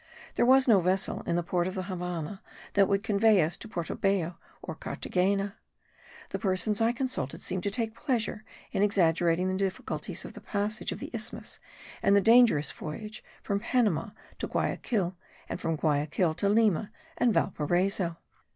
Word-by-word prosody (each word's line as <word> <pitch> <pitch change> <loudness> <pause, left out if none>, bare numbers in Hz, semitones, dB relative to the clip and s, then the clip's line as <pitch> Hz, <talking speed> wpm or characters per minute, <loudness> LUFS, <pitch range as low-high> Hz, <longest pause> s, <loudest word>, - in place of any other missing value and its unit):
There 240 - +2
was 265 +1 +6
no 215 -5 +6
vessel 185 +2 0
in - - +1
the 175 - +1
port 175 +1 0
of 185 - -4
the 185 - -2
Havannah 180 0 -4 0.3
that 200 -1 +5
would 200 0 +1
convey 215 -1 +4
us 160 +3 -1
to - - -9
Porto 170 -6 -4
Bello 185 -3 0 0.3
or - - -5
Carthagena. 195 +2 -1 0.8
The - - -2
persons 200 +2 0
I 225 +1 +4
consulted 250 - -3
seemed 185 - -2
to 200 - -1
take 220 +1 -1
pleasure 230 -3 -2 0.3
in - - 0
exaggerating 175 -3 +3
the 185 - 0
difficulties 190 +1 -3
of - - -8
the - - -10
passage 210 +1 -2
of - - -6
the - - -6
isthmus, - - -3 0.4
and 200 - +4
the - - +7
dangerous 225 - +5
voyage 210 +8 -7 0.2
from 200 -1 0
Panama 230 - +1 0.3
to - - -2
Guyaquil, 190 -7 -1 0.3
and - - -5
from 165 - 0
Guyaquil 155 +3 +1
to 200 - +1
Lima 210 -2 +3 0.3
and 245 -1 +4
Valparaiso. 175 0 0
195 Hz, 170 wpm, -29 LUFS, 175-215 Hz, 0.8 s, the